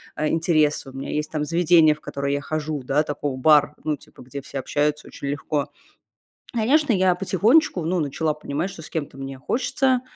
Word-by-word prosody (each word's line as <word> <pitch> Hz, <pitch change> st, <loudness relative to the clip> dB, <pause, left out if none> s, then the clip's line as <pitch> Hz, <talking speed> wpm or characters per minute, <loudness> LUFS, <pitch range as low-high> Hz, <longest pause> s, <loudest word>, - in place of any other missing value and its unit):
а, 155 Hz, -, 0 dB
интересы, 155 Hz, -3 st, +1 dB
у -, -, -13 dB
меня 135 Hz, +1 st, -5 dB
есть, 150 Hz, 0 st, -2 dB
там, 150 Hz, -1 st, -2 dB
заведения, 165 Hz, -1 st, +5 dB
в 150 Hz, -, -15 dB
которые 140 Hz, 0 st, -3 dB
я 145 Hz, -, -1 dB
хожу, 155 Hz, 0 st, -3 dB
да, 140 Hz, +4 st, +2 dB
такой 145 Hz, -2 st, -3 dB
бар, 150 Hz, +1 st, +4 dB
ну, 155 Hz, -1 st, 0 dB
типа, -, -, -17 dB
где 140 Hz, +3 st, -7 dB
все 135 Hz, -, -8 dB
общаются 150 Hz, +3 st, -1 dB
очень 140 Hz, -, -7 dB
легко. 145 Hz, 0 st, -2 dB, 0.8 s
Конечно, 260 Hz, +4 st, +3 dB
я 185 Hz, -2 st, +3 dB
потихонечку, 195 Hz, -, +3 dB
ну, 175 Hz, +3 st, 0 dB
начала 150 Hz, +1 st, -1 dB
понимать, 150 Hz, +4 st, -3 dB
что 180 Hz, -4 st, -10 dB
с -, -, -11 dB
кем-то 145 Hz, -4 st, -4 dB
мне 135 Hz, -1 st, -7 dB
хочется 260 Hz, -, +1 dB
150 Hz, 190 wpm, -23 LUFS, 145-175 Hz, 0.8 s, заведения